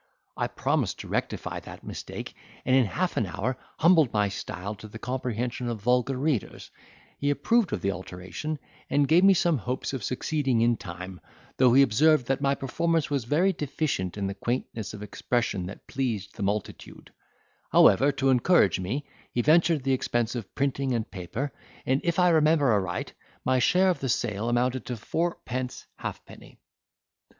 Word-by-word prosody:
I - - -1
promised - - -1
to - - -9
rectify - - -3
that - - -11
mistake - - -7 0.3
and 130 - +4
in 130 -2 +5
half 180 - -2
an 110 - +1
hour 110 +9 -2 0.2
humbled 160 -6 +5
my 105 -2 +1
style 100 0 -5
to 110 - -10
the 110 - -9
comprehension 125 0 -3
of 115 -2 -3
vulgar 125 +2 +2
readers; 140 -5 -2 0.5
he 145 - 0
approved 185 - +2
of - - -2
the 100 - +1
alteration, 95 - -6 0.3
and 145 0 +3
gave 170 +5 +5
me 195 0 +7
some 170 -5 +2
hopes 125 +5 -3
of 130 -5 -4
succeeding 130 -2 0
in 120 0 +4
time, 90 -1 -8 0.4
though 125 -2 +5
he 140 - +8
observed 145 +3 +4
that 135 +2 -1
my 140 0 +2
performance 165 +4 0
was 140 -5 0
very 175 +10 +2
deficient 140 - -2
in 100 - -2
the 95 - -2
quaintness 110 -1 -3
of 105 - -8
expression 105 -4 -1
that 100 - -10
pleases 115 -7 -2
the - - -10
multitude: 100 +1 -4 0.6
however, 135 +9 +6
to 135 -1 +1
encourage 125 - +4
me, 120 +11 -3 0.3
he 120 - 0
ventured 160 -1 +4
the 135 0 +2
expense 120 -2 0
of 115 -6 -7
printing 135 -1 0
and 110 -2 -3
paper, 105 - -4 0.3
and, 135 +2 +1
if 170 -2 0
I 180 -1 +5
remember 155 -4 +4
aright, 95 -3 -2 0.3
my 130 0 +3
share 185 +8 +4
of 175 - -3
the 135 - -3
sale 115 -1 -1
amounted 125 +1 0
to 125 - -3
fourpence 130 -2 -3
halfpenny. - - -9
130 Hz, 170 wpm, -27 LUFS, 110-145 Hz, 0.6 s, he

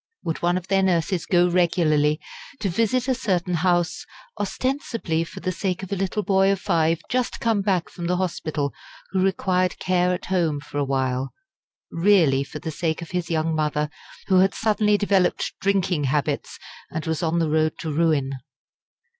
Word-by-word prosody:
Would 165 - -3
one 175 +1 +2
of 185 0 -6
their 195 0 +3
nurses 180 -1 +1
go 175 -1 +4
regularly 165 -4 +2 0.4
to 200 - -1
visit 230 +7 +1
a 260 - +3
certain 185 -8 -1
house, 175 0 +1 0.4
ostensibly 220 - -1
for 165 - -9
the 185 - -1
sake 185 0 -2
of 190 - -8
a - - +1
little 195 +2 -1
boy 195 0 +3
of 195 - 0
five 165 -4 +1
just 250 -1 -1
come 225 -3 +1
back 190 -4 +1
from 175 -2 -6
the 180 +1 +1
hospital, 155 -5 -2 0.4
who 190 - +1
required 185 -1 +1
care 180 -1 +1
at 180 - -3
home 165 -5 +1
for 145 0 -6
a - - +2
while, 130 -1 -1 0.6
really 165 -7 +4
for 140 - -8
the 160 +1 -5
sake 160 +1 -2
of 165 - -11
his 180 -1 -2
young 160 -1 0
mother, 150 -1 0 0.3
who 185 -1 +4
had 190 +1 +3
suddenly 210 -1 +2
developed 200 -3 +1
drinking 185 -6 +1
habits 145 +1 -1 0.3
and 160 0 -4
was 160 -1 -1
on 165 0 0
the 165 -2 +1
road 155 0 +2
to 160 - -4
ruin? 150 -4 +1
175 Hz, 180 wpm, -23 LUFS, 155-195 Hz, 0.6 s, go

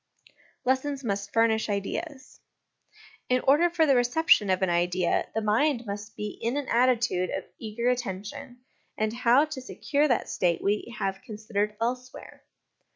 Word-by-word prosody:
Lessons 265 +2 0
must 200 -3 -3
furnish 225 -1 +2
Ideas. 260 - -4 0.9
In 255 0 +3
order 295 +6 +4
for 335 -2 +2
the 275 -3 +4
reception 245 -3 +3
of 185 +1 +1
an 190 - +2
idea, 175 +1 +1
the 220 - 0
mind 235 +4 +1
must 205 +1 -6
be 210 -1 -5
in 235 +5 -1
an 285 -2 -3
attitude 235 -7 +2
of - - -4
eager 225 +2 -3
attention, 245 +1 -3 0.4
and 215 0 0
how 250 +4 +4
to 305 -4 -7
secure 290 +3 0
that 245 -5 +1
state 175 -2 0
we 210 +4 -1
have 195 0 -2
considered 215 -3 -3
elsewhere. 250 +2 -5
235 Hz, 150 wpm, -27 LUFS, 205-260 Hz, 0.9 s, order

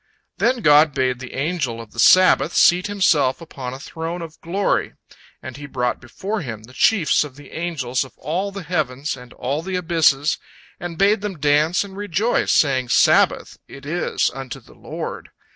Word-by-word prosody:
Then 245 0 +1
God 150 -3 +5
bade 130 -2 0
the 130 -1 -9
Angel 140 -5 -2
of 115 -2 -10
the - - -10
Sabbath 185 0 +5
seat 180 +2 +4
himself 160 -10 +2
upon 135 -6 -7
a - - -10
throne 165 +3 -6
of 160 -1 -11
glory, 190 +4 -1 0.5
and 130 -2 -8
He 145 0 -8
brought 125 -3 -2
before 195 - -5
him 110 -7 -7
the 125 +3 -15
chiefs 175 +2 +3
of 145 -3 -10
the 145 -1 -14
angels 145 -7 -2
of 130 - -15
all 180 +8 -3
the 195 -1 -7
heavens 150 -5 -2
and 125 -1 -13
all 140 +5 -3
the 190 +2 -4
abysses, 160 -5 +2 0.4
and 175 -2 -6
bade 200 +2 +3
them 205 -4 -4
dance 150 +5 +2
and 195 -1 -11
rejoice, 205 +3 0
saying, 130 -4 +2
"Sabbath - - +3
it 140 0 -12
is 165 +4 -1
unto 135 -2 -7
the - - -19
Lord!" - - -7
155 Hz, 175 wpm, -21 LUFS, 130-180 Hz, 0.5 s, God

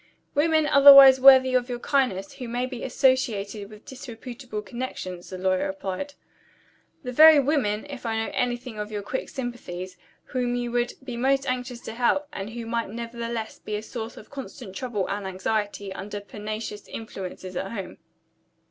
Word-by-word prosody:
"Women, 315 +1 +3
otherwise 275 -2 +9
worthy 260 -1 +8
of 250 0 +1
your 245 - -2
kindness, 240 -8 0
who 250 - -7
may 245 +2 -1
be 255 -2 -7
associated 230 -6 0
with 215 0 -14
disreputable 245 -3 -8
connections," 195 -7 -6
the 185 - -6
lawyer 185 0 +1
replied. 195 +9 -5 0.9
"The 250 - -4
very 310 +3 +8
women, 260 -7 0
if 280 -3 -8
I 225 -2 -1
know 225 - -2
anything 245 -2 -2
of 210 +1 -5
your 205 -1 -4
quick 260 +6 -4
sympathies, 190 -8 -6 0.3
whom 245 -1 -2
you 245 -1 -2
would 240 0 0
be 250 -3 -6
most 270 +2 +2
anxious 250 -1 -3
to 220 - -7
help, 250 +5 +1
and 195 +2 -5
who 230 0 -6
might 230 -1 -2
nevertheless 230 0 -5
be 210 - -5
a 210 - -4
source 225 0 -7
of 215 - -13
constant 255 -7 -8
trouble 215 -5 -2
and 200 -1 -3
anxiety, 200 +1 -2
under 205 +2 -6
pernicious 210 +1 -6
influences 185 -4 -7
at 195 +2 -3
home." 195 -5 -7
235 Hz, 165 wpm, -25 LUFS, 205-255 Hz, 0.9 s, otherwise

